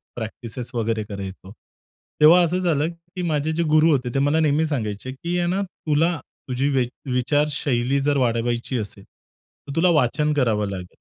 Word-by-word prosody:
Practices 115 Hz, +1 st, -6 dB
वगैरे 115 Hz, -2 st, -1 dB
करायचो. 95 Hz, -2 st, -8 dB, 0.7 s
तेव्हा 165 Hz, +4 st, +8 dB
असं 175 Hz, +2 st, +1 dB
झालं 160 Hz, -4 st, +1 dB
की 175 Hz, +2 st, -10 dB
माझे 155 Hz, -2 st, 0 dB
जे 170 Hz, +2 st, 0 dB
गुरु 155 Hz, +1 st, +4 dB
होते, 125 Hz, -4 st, +1 dB
ते 135 Hz, -, +1 dB
मला 145 Hz, +3 st, +2 dB
नेहमी 155 Hz, 0 st, +2 dB
सांगायचे 120 Hz, -5 st, -3 dB
की 170 Hz, +7 st, -3 dB
आहे 175 Hz, -, +1 dB
ना, 185 Hz, +3 st, 0 dB
तुला 165 Hz, -2 st, 0 dB, 0.3 s
तुझी 130 Hz, +2 st, 0 dB
वि 135 Hz, -3 st, +2 dB, 0.3 s
विचारशैली 140 Hz, -1 st, +1 dB
जर 145 Hz, 0 st, +1 dB
वाढवायची 120 Hz, 0 st, 0 dB
असेल 100 Hz, -3 st, -6 dB
तर, 140 Hz, -, -16 dB
तुला 180 Hz, +2 st, +4 dB
वाचन 150 Hz, +4 st, +1 dB
करावं 110 Hz, -7 st, +1 dB
लागेल. 90 Hz, -2 st, -6 dB
140 Hz, 165 wpm, -23 LUFS, 120-160 Hz, 0.7 s, तेव्हा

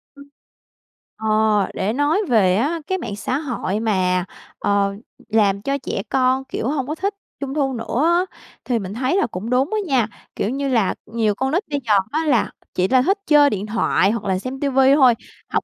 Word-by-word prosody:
Ừm. 280 Hz, 0 st, -13 dB, 0.9 s
Ờ, 220 Hz, -, -4 dB, 0.5 s
để 205 Hz, +4 st, -1 dB
nói 295 Hz, -, +2 dB
về 190 Hz, -6 st, +4 dB
á 300 Hz, +10 st, 0 dB
cái 375 Hz, -, 0 dB
mạng 205 Hz, -, -5 dB
xã 250 Hz, +6 st, -2 dB
hội 235 Hz, -8 st, -3 dB
mà, 185 Hz, -4 st, +1 dB, 0.3 s
ờ, 200 Hz, -1 st, +1 dB, 0.3 s
làm 200 Hz, -2 st, +2 dB
cho 275 Hz, +4 st, -1 dB
trẻ 225 Hz, -7 st, -4 dB
con, 260 Hz, 0 st, +2 dB
kiểu, 240 Hz, -, -4 dB
hông 275 Hz, -3 st, -2 dB
có 305 Hz, -, -3 dB
thích 395 Hz, +4 st, -2 dB, 0.3 s
Trung 275 Hz, -1 st, -4 dB
thu 275 Hz, -3 st, 0 dB
nữa 230 Hz, +2 st, -2 dB
á, 345 Hz, +2 st, +3 dB, 0.4 s
thì 245 Hz, -3 st, 0 dB
mình 195 Hz, 0 st, -6 dB
thấy 260 Hz, +9 st, 0 dB
là 395 Hz, -, +2 dB
cũng 215 Hz, +1 st, -6 dB
đúng 260 Hz, +7 st, +1 dB
á -, -, +1 dB
nha. 250 Hz, -6 st, +2 dB, 0.3 s
Kiểu 205 Hz, -, -1 dB
như 275 Hz, +2 st, -2 dB
là 225 Hz, -7 st, +1 dB
nhiều 220 Hz, -2 st, 0 dB
con 265 Hz, +3 st, -1 dB
nít 360 Hz, +7 st, +1 dB
bây 285 Hz, -1 st, -1 dB
giờ 210 Hz, -, +4 dB, 0.2 s
á 315 Hz, +2 st, 0 dB
là 265 Hz, -7 st, +2 dB, 0.2 s
chỉ 185 Hz, +1 st, +2 dB
ra 255 Hz, +2 st, +4 dB
thích 390 Hz, +10 st, +2 dB
chơi 290 Hz, -1 st, +6 dB
điện 205 Hz, -1 st, -3 dB
thoại 210 Hz, -2 st, +2 dB
hoặc 230 Hz, -2 st, -3 dB
là 185 Hz, -, +1 dB
xem 260 Hz, +5 st, -6 dB
TV 275 Hz, -2 st, 0 dB, 0.2 s
thôi, 260 Hz, -4 st, +6 dB, 0.4 s
học -, -, 0 dB
255 Hz, 205 wpm, -21 LUFS, 210-280 Hz, 0.9 s, chơi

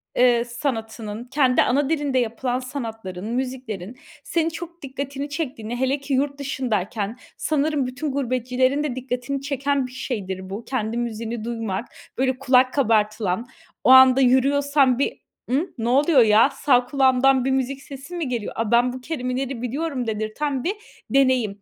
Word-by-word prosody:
eee, 240 Hz, -1 st, +4 dB
sanatının, 225 Hz, -3 st, -4 dB
kendi 260 Hz, 0 st, +2 dB
ana 275 Hz, +3 st, +2 dB
dilinde 290 Hz, -5 st, +1 dB
yapılan 245 Hz, +2 st, -1 dB
sanatların, 225 Hz, -8 st, -6 dB
müziklerin 250 Hz, -5 st, -4 dB, 0.3 s
senin 330 Hz, -1 st, 0 dB
çok 340 Hz, +1 st, -9 dB
dikkatini 280 Hz, +1 st, -5 dB
çektiğini, 255 Hz, -7 st, -4 dB
hele 265 Hz, +3 st, 0 dB
ki, 280 Hz, 0 st, -4 dB
yurt 280 Hz, +2 st, 0 dB
dışındayken 225 Hz, -5 st, -2 dB, 0.2 s
sanırım 295 Hz, -3 st, 0 dB
bütün 260 Hz, +3 st, -4 dB
gurbetçilerin 255 Hz, +1 st, 0 dB
de 265 Hz, -4 st, -2 dB
dikkatini 255 Hz, +1 st, -3 dB
çeken 280 Hz, -1 st, -1 dB
bir -, -, -14 dB
şeydir 190 Hz, -7 st, -5 dB
bu; 205 Hz, +4 st, -6 dB
kendi 230 Hz, -3 st, -2 dB
müziğini 230 Hz, -1 st, -3 dB
duymak, 225 Hz, -3 st, -3 dB, 0.3 s
böyle, 260 Hz, 0 st, +1 dB
kulak 255 Hz, -1 st, +4 dB
kabartılan, 215 Hz, -4 st, +1 dB, 0.4 s
o -, -, +3 dB
anda 260 Hz, 0 st, +8 dB
yürüyorsan 275 Hz, +1 st, +3 dB
bir; 280 Hz, -, +1 dB, 0.4 s
"I, 300 Hz, +8 st, +1 dB
ne 230 Hz, +1 st, -1 dB
oluyor 280 Hz, +1 st, +5 dB
ya? 220 Hz, +4 st, +5 dB
Sağ 250 Hz, -4 st, +2 dB
kulağımdan 265 Hz, 0 st, +3 dB
bir 270 Hz, -, +1 dB
müzik 265 Hz, +1 st, -1 dB
sesi 280 Hz, +5 st, -9 dB
mi 325 Hz, -6 st, -2 dB
geliyor? 235 Hz, -4 st, -3 dB
Aaa, 225 Hz, -1 st, -2 dB
ben 245 Hz, +1 st, +4 dB
bu 255 Hz, -, -7 dB
kelimeleri 255 Hz, -3 st, -3 dB
biliyorum." 265 Hz, 0 st, -2 dB
dedirten 225 Hz, +6 st, -2 dB
bir 380 Hz, -, 0 dB, 0.4 s
deneyim. 255 Hz, -7 st, +2 dB
255 Hz, 150 wpm, -23 LUFS, 235-275 Hz, 0.4 s, anda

